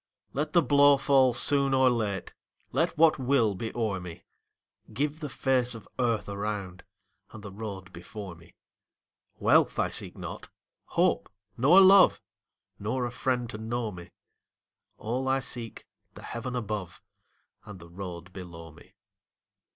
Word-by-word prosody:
Let 150 +2 -2
the 170 - +5
blow 145 -1 +5
fall 135 -2 +4
soon 140 +2 +3
or 130 0 +4
late, 105 -5 -3 0.4
Let - - 0
what 160 -2 +5
will 125 -5 +2
be 110 +4 -5
o'er 110 -5 -1
me; 90 -2 -10 0.7
Give 145 +7 -2
the 150 -3 -5
face 125 -1 0
of 110 - -11
earth 115 -4 0
around 100 -2 -5 0.5
And 110 - -11
the 100 - -8
road 95 -3 -8
before 95 +2 -8
me. 85 0 -19 0.8
Wealth - - +3
I - - +1
seek - - -1
not, - - -8 0.4
hope - - +1 0.3
nor 145 +10 +6
love, 195 0 +7 0.6
Nor 120 +5 -2
a 120 - -4
friend 125 -1 -1
to 105 - -7
know 115 0 -3
me; 90 -2 -11 0.9
All 125 +4 -3
I 135 0 +2
seek, 120 -4 -5 0.3
the - - -11
heaven 125 +2 -5
above 105 -6 -4 0.6
And 105 - -10
the 85 -1 -13
road 90 -1 -8
below 85 -3 -10
me. - - -19
115 Hz, 145 wpm, -28 LUFS, 100-130 Hz, 0.9 s, love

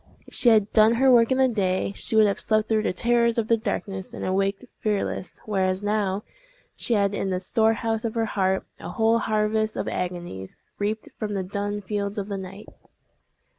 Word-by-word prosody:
If - - -17
she 245 - +4
had 215 -3 +3
done 220 +1 +5
her 265 +2 +4
work 235 0 +5
in 260 - +3
the 265 0 +5
day, 195 -5 0
she - - +1
would 220 -1 +7
have 200 - 0
slept 215 0 +1
through 220 -2 +2
the - - 0
terrors 235 +4 +2
of 225 -2 0
the 230 - +5
darkness, 195 -4 -4
and - - -5
awaked 195 +3 0
fearless; 205 -3 -2
whereas 190 -2 0
now, 205 -1 0 0.5
she 235 - 0
had 200 -1 +2
in 195 - -2
the 185 -1 -1
storehouse 225 +3 +1
of 230 -1 -3
her 225 -1 +1
heart 190 -3 0
a - - -7
whole 225 0 +2
harvest 215 0 0
of - - -2
agonies, 175 - -5 0.2
reaped 215 +2 -2
from 210 -1 -3
the 190 - -1
dun 205 +2 -3
fields 200 +1 -3
of 200 0 -3
the 200 - -3
night! 190 +2 -9
210 Hz, 200 wpm, -25 LUFS, 195-225 Hz, 0.5 s, would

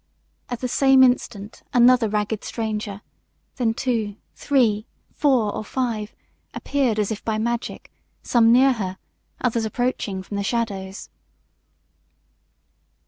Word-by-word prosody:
At 245 -1 -5
the 255 - -1
same 270 +1 +5
instant 230 -4 0
another 245 -2 +5
ragged 210 0 -2
stranger, 215 -3 -4 0.5
then 230 -3 +1
two, 225 -6 -1 0.2
three, 230 -7 +1 0.3
four, 250 -8 +2
or - - -4
five, 225 -2 -3 0.4
appeared 265 -6 0
as 210 0 0
if 215 - -5
by 220 -1 -1
magic, 235 +2 -3 0.3
some 230 -2 +4
near 260 +2 +6
her, 190 -5 -4 0.4
others 235 -2 0
approaching 220 -4 -2
from 205 - -6
the 200 - -1
shadows. 200 -4 -3
225 Hz, 120 wpm, -23 LUFS, 210-250 Hz, 0.5 s, near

